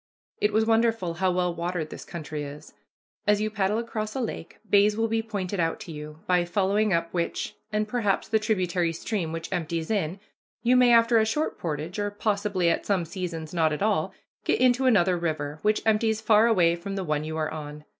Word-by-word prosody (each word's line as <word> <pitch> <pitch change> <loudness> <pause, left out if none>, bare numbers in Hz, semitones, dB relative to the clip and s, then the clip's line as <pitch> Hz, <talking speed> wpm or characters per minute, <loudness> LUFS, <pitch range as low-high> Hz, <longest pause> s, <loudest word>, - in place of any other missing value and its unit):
It 210 - +3
is 220 0 +4
wonderful 225 -5 +2
how 185 +3 +1
well 180 -1 0
watered 170 -2 -3
this - - -8
country 155 -3 -6
is. 145 +2 -9 0.5
As 210 0 +4
you 215 0 -1
paddle 205 0 0
across 215 -2 -4
a - - -1
lake, 225 -8 -5
bays 205 +1 +4
will 225 0 +1
be 225 0 0
pointed 200 -4 -4
out 165 -1 0
to 170 - -8
you, 150 +1 -9
by 180 -2 +3
following 200 +4 +1
up 170 -1 0
which, 170 -1 -2 0.2
and 210 0 0
perhaps 210 -4 0
the 220 - +2
tributary 180 -6 0
stream 170 -1 -3
which 165 +2 -5
empties 165 0 -2
in, 190 -3 -1 0.4
you 250 +1 +4
may, 250 -1 +6
after 230 0 +5
a - - +4
short 300 +8 -1
portage, 160 +3 -4
or 205 0 0
possibly, 205 -3 0
at 170 - +1
some 190 -4 0
seasons, 165 -2 -5
none 160 -2 +2
at 150 +6 -2
all, 195 -4 +1 0.3
get - - +1
into 255 +1 +4
another 185 -6 +3
river, 155 -3 -3
which 210 0 +1
empties 220 0 +2
far 220 0 +4
away 175 -7 +4
from 195 +3 -6
the 195 - -2
one 150 -3 -1
you 155 +1 -4
are 155 -1 -1
on. 150 -1 -7
190 Hz, 205 wpm, -26 LUFS, 165-215 Hz, 0.5 s, may